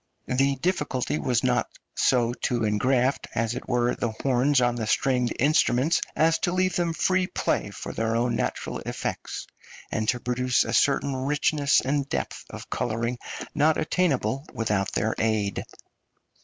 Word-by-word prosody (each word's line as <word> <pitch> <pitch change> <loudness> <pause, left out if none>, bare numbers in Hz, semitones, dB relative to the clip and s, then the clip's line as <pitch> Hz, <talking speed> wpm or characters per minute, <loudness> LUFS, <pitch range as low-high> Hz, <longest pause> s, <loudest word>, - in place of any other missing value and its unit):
The 135 +2 +2
difficulty 150 -3 -1
was 125 -3 0 0.5
so 120 -2 +2
to 120 -1 -1
engraft, 125 +5 +1
as 115 0 0
it 125 - -7
were, 120 -1 +2
the 120 - -2
horns 135 +1 +3
on 120 -1 +2
the 115 -2 -3
stringed 125 0 +1
instruments 140 +1 +3
as 165 +1 +3
to 175 - 0
leave 185 0 +1
them 175 -2 +1
free 185 +2 +1
play - - -1
for - - -7
their 115 0 -1
own 120 +1 +1
natural - - -2
effects, - - -5 0.5
and 110 -1 -1
to 125 - +1
produce 125 +1 +1
a - - -4
certain 140 -1 +2
richness 145 +2 +2
and 140 0 -1
depth - - -3
of - - -9
colouring 120 0 -2 0.3
not 155 +2 +3
attainable 140 - 0
without 105 -3 0
their 110 0 0
aid. 110 -3 0
125 Hz, 150 wpm, -26 LUFS, 120-145 Hz, 0.5 s, horns